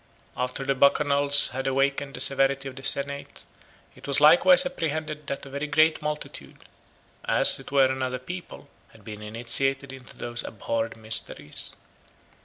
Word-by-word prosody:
After 125 Hz, +2 st, -4 dB
the 135 Hz, -, 0 dB
Bacchanals 140 Hz, +1 st, +4 dB
had 130 Hz, +1 st, -5 dB
awakened 140 Hz, +1 st, -1 dB
the -, -, -8 dB
severity 135 Hz, 0 st, +2 dB
of 130 Hz, -, -9 dB
the 135 Hz, -, -10 dB
senate, 140 Hz, +1 st, -2 dB, 0.5 s
it -, -, -13 dB
was 140 Hz, 0 st, +1 dB
likewise 175 Hz, -, +6 dB
apprehended 155 Hz, -, -5 dB
that 140 Hz, -, -6 dB
a -, -, -11 dB
very 140 Hz, +2 st, -5 dB
great 155 Hz, +2 st, +2 dB
multitude, 150 Hz, 0 st, -7 dB, 0.6 s
as -, -, +5 dB
it -, -, -12 dB
were 140 Hz, -1 st, +4 dB
another 130 Hz, -1 st, -3 dB
people, 175 Hz, +8 st, -10 dB, 0.3 s
had -, -, -19 dB
been 105 Hz, -1 st, -9 dB
initiated 135 Hz, +5 st, -2 dB
into 130 Hz, -2 st, -14 dB
those 120 Hz, 0 st, -7 dB
abhorred 115 Hz, +1 st, -5 dB
mysteries. 110 Hz, 0 st, -4 dB
140 Hz, 150 wpm, -24 LUFS, 130-145 Hz, 0.6 s, likewise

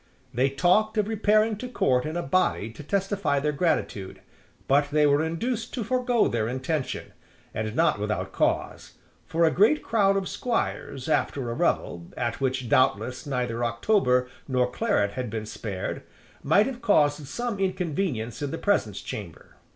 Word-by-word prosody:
They 130 Hz, +3 st, +2 dB
talked 185 Hz, +10 st, +2 dB
of 210 Hz, -1 st, +2 dB
repairing 215 Hz, 0 st, +2 dB
to 250 Hz, -, -6 dB
Court 130 Hz, -, +1 dB
in 160 Hz, +2 st, -3 dB
a 175 Hz, -, -2 dB
body 135 Hz, -, +1 dB
to 120 Hz, -, -11 dB
testify 195 Hz, -4 st, 0 dB
their 150 Hz, +2 st, 0 dB
gratitude: 140 Hz, -, -1 dB, 0.5 s
but 145 Hz, +1 st, +3 dB
they 150 Hz, 0 st, +3 dB
were 145 Hz, +1 st, +3 dB
induced 220 Hz, +9 st, -3 dB
to 245 Hz, -, -2 dB
forego 245 Hz, 0 st, +2 dB
their 110 Hz, -2 st, -1 dB
intention; 130 Hz, +4 st, -3 dB, 0.4 s
and 110 Hz, +1 st, -3 dB
not 160 Hz, -7 st, +2 dB
without 105 Hz, +1 st, -2 dB
cause: -, -, -1 dB, 0.3 s
for 165 Hz, +1 st, +2 dB
a 160 Hz, -, +4 dB
great 225 Hz, +11 st, +3 dB
crowd 195 Hz, -3 st, +2 dB
of 195 Hz, -1 st, -2 dB
squires 140 Hz, -, -3 dB
after 135 Hz, -5 st, 0 dB
a -, -, -2 dB
revel, 85 Hz, -7 st, -1 dB
at 120 Hz, +2 st, -2 dB
which 130 Hz, -2 st, -1 dB
doubtless 125 Hz, +3 st, +1 dB
neither 125 Hz, -3 st, -2 dB
October 125 Hz, -, +2 dB, 0.2 s
nor 125 Hz, -2 st, +1 dB
claret 160 Hz, -, +1 dB
had 125 Hz, +1 st, -4 dB
been 110 Hz, 0 st, -4 dB
spared, 100 Hz, -3 st, -5 dB, 0.4 s
might 180 Hz, +9 st, +4 dB
have 255 Hz, -2 st, -5 dB
caused 150 Hz, -9 st, +2 dB
some 240 Hz, -, -3 dB
inconvenience 175 Hz, -, -2 dB
in 145 Hz, -, -2 dB
the 165 Hz, -, -4 dB
presence 120 Hz, -, 0 dB
chamber. 95 Hz, -7 st, -8 dB
145 Hz, 160 wpm, -26 LUFS, 125-200 Hz, 0.5 s, a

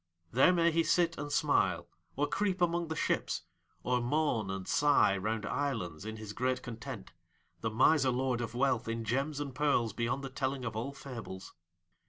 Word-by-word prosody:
There 130 Hz, +9 st, +6 dB
may 170 Hz, -1 st, +3 dB
he 165 Hz, +1 st, +3 dB
sit 170 Hz, +1 st, +2 dB
and 145 Hz, 0 st, -4 dB
smile, -, -, +2 dB, 0.3 s
or 145 Hz, -, +1 dB
creep 190 Hz, +3 st, 0 dB
among 170 Hz, -1 st, +1 dB
the 160 Hz, -, -3 dB
ships, -, -, -1 dB, 0.4 s
or 125 Hz, 0 st, +1 dB
moan 120 Hz, -5 st, 0 dB
and 95 Hz, -1 st, -4 dB
sigh 145 Hz, -9 st, +4 dB
round 105 Hz, +2 st, -2 dB
islands 115 Hz, -, -2 dB
in 110 Hz, 0 st, -5 dB
his 110 Hz, -1 st, -7 dB
great 130 Hz, +2 st, -1 dB
content 115 Hz, -2 st, -7 dB, 0.5 s
the 110 Hz, -, -1 dB
miser 130 Hz, +5 st, +4 dB
lord 125 Hz, -1 st, 0 dB
of 120 Hz, 0 st, -4 dB
wealth 125 Hz, -2 st, +1 dB
in 115 Hz, 0 st, -2 dB
gems 135 Hz, +6 st, -1 dB
and 140 Hz, -2 st, -4 dB
pearls 135 Hz, -5 st, +1 dB
beyond 120 Hz, +4 st, -1 dB
the 135 Hz, -, -5 dB
telling 130 Hz, -1 st, -2 dB
of 115 Hz, -2 st, -4 dB
all 120 Hz, +5 st, -3 dB
fables. 115 Hz, -9 st, -8 dB
130 Hz, 180 wpm, -32 LUFS, 115-145 Hz, 0.5 s, There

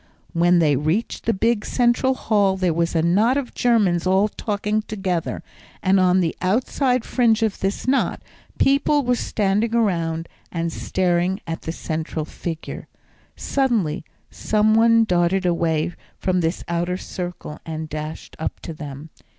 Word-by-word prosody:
When 175 Hz, +1 st, +4 dB
they 155 Hz, -4 st, +4 dB
reached 155 Hz, -, -1 dB
the -, -, +5 dB
big 225 Hz, +2 st, +1 dB
central 250 Hz, +2 st, +2 dB
hall 200 Hz, -5 st, +2 dB
there 185 Hz, -3 st, +1 dB
was 170 Hz, +1 st, 0 dB
a 160 Hz, -, +2 dB
knot 210 Hz, +10 st, +3 dB
of 275 Hz, -3 st, -3 dB
Germans 200 Hz, -8 st, +2 dB
all 190 Hz, +3 st, +3 dB
talking 210 Hz, +1 st, -1 dB
together, 190 Hz, -6 st, -3 dB, 0.4 s
and 190 Hz, 0 st, +4 dB
on 185 Hz, 0 st, +4 dB
the 165 Hz, -2 st, -1 dB
outside 250 Hz, +5 st, +1 dB
fringe 230 Hz, -3 st, +2 dB
of 220 Hz, -2 st, -1 dB
this 195 Hz, +5 st, -2 dB
knot, 270 Hz, +1 st, +1 dB, 0.4 s
people 280 Hz, +1 st, +3 dB
were 250 Hz, 0 st, +2 dB
standing 215 Hz, +1 st, 0 dB
around 170 Hz, -7 st, 0 dB, 0.2 s
and 165 Hz, -1 st, -2 dB
staring 180 Hz, +1 st, 0 dB
at 165 Hz, 0 st, -4 dB
the 160 Hz, -, -4 dB
central 160 Hz, -1 st, -4 dB
figure. 165 Hz, 0 st, -6 dB, 0.5 s
Suddenly 230 Hz, -, 0 dB, 0.3 s
some 215 Hz, 0 st, +2 dB
one 230 Hz, 0 st, +5 dB
darted 180 Hz, -1 st, +1 dB
away 170 Hz, -1 st, +1 dB, 0.2 s
from 185 Hz, -1 st, 0 dB
this 165 Hz, +1 st, -1 dB
outer 175 Hz, +1 st, -1 dB
circle 175 Hz, -5 st, -6 dB
and 160 Hz, -1 st, -5 dB
dashed 155 Hz, +1 st, -6 dB
up 160 Hz, -, -3 dB
to 165 Hz, -, -6 dB
them. 150 Hz, 0 st, -8 dB
185 Hz, 150 wpm, -22 LUFS, 165-220 Hz, 0.5 s, the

